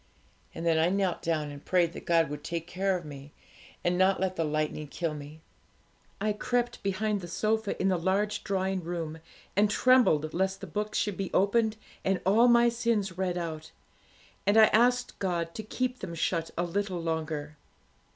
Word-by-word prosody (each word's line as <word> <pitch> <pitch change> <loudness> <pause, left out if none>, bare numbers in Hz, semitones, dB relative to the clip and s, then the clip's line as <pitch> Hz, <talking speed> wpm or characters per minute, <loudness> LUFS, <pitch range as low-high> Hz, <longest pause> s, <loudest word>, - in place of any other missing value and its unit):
And 165 - -5
then 165 -1 +3
I 165 +2 +3
knelt 190 -1 0
down, 155 -3 -1
and 145 0 -10
prayed 175 -2 +2
that - - -10
God 165 -3 +3
would 150 0 -6
take 170 -1 -3
care 185 +2 0
of 175 - -9
me, 145 -1 -10 0.5
and 180 +1 +1
not 190 0 +4
let 190 0 -1
the 165 - 0
lightning 155 0 -2
kill 165 +2 -3
me. 150 +1 -9 0.8
I 210 +1 0
crept 245 +3 -1
behind 200 +1 -1
the 175 - -7
sofa 215 +3 -1
in 195 - +2
the 185 -2 +1
large 195 +4 0
drawing 190 -2 -1
room, 165 -2 -4 0.4
and 205 +2 +4
trembled 205 - +4
lest 190 +1 0
the 195 - -7
books 210 +4 -3
should 205 -3 -1
be 195 -2 -3
opened, 220 +3 +2 0.3
and 190 -1 +1
all 220 +6 +5
my 240 0 +6
sins 230 -5 0
read 180 -2 0
out; 160 -2 -5 0.8
and 205 +2 +4
I 220 - +9
asked 245 +2 +3
God 170 -3 -1
to - - -5
keep 250 +4 -3
them 170 -3 -6
shut 165 0 -1
a 175 - +1
little 185 +1 -2
longer. 155 -2 -3
185 Hz, 185 wpm, -29 LUFS, 165-210 Hz, 0.8 s, I